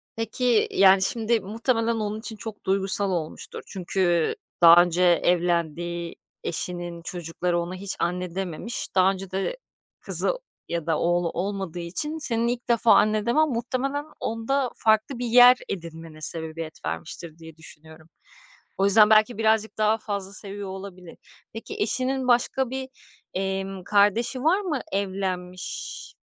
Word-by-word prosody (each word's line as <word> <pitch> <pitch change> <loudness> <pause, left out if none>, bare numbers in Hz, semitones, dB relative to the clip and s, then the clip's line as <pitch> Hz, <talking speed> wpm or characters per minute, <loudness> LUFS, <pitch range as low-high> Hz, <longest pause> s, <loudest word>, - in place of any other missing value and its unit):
Peki, 225 0 +1
yani 195 0 +5
şimdi 225 +3 +1
muhtemelen 230 +3 -1
onun 215 -1 -3
için 225 0 -6
çok 215 0 -9
duygusal 195 +1 +4
olmuştur. 165 -4 -5
Çünkü 175 -3 0 0.3
daha 170 0 +9
önce 175 0 -1
evlendiği 170 -1 0 0.3
eşinin 175 0 -4
çocukları 175 0 -3
ona 170 +2 -4
hiç 195 +1 -5
anne 180 0 -2
dememiş. 190 +5 -3
Daha 190 0 +5
önce 195 -1 -7
de 195 - -2 0.4
kızı - - +3 0.4
ya 170 -2 -3
da 160 -2 0
oğlu 175 0 +1
olmadığı 190 -1 -4
için 245 - -3
senin 235 -6 +2
ilk 240 0 -3
defa 235 -1 +5
anne 215 0 +2
demen 305 +6 +2
muhtemelen 260 +4 -2
onda 245 +4 -1
farklı 220 +3 +1
bir 245 - -2
yer 245 +2 +7
edinmene 165 -3 -8
sebebiyet 160 0 -1
vermiştir, 85 - -5
diye 160 -1 -13
düşünüyorum. 160 0 -9 0.7
O 195 - +2
yüzden 210 +2 +6
belki 215 +1 +4
birazcık 220 -1 +1
daha 215 +1 +2
fazla 200 -3 -4
seviyor 200 -1 -4
olabilir. 190 -2 -9 0.4
Peki 225 - -7
eşinin 255 +4 0
başka 245 +1 +2
bir, 265 0 -4 0.5
emm, 195 0 -3
kardeşi 210 +6 +2
var 355 +6 +3
mı 330 -9 -2
evlenmiş 185 -2 -4
195 Hz, 135 wpm, -24 LUFS, 175-230 Hz, 0.7 s, daha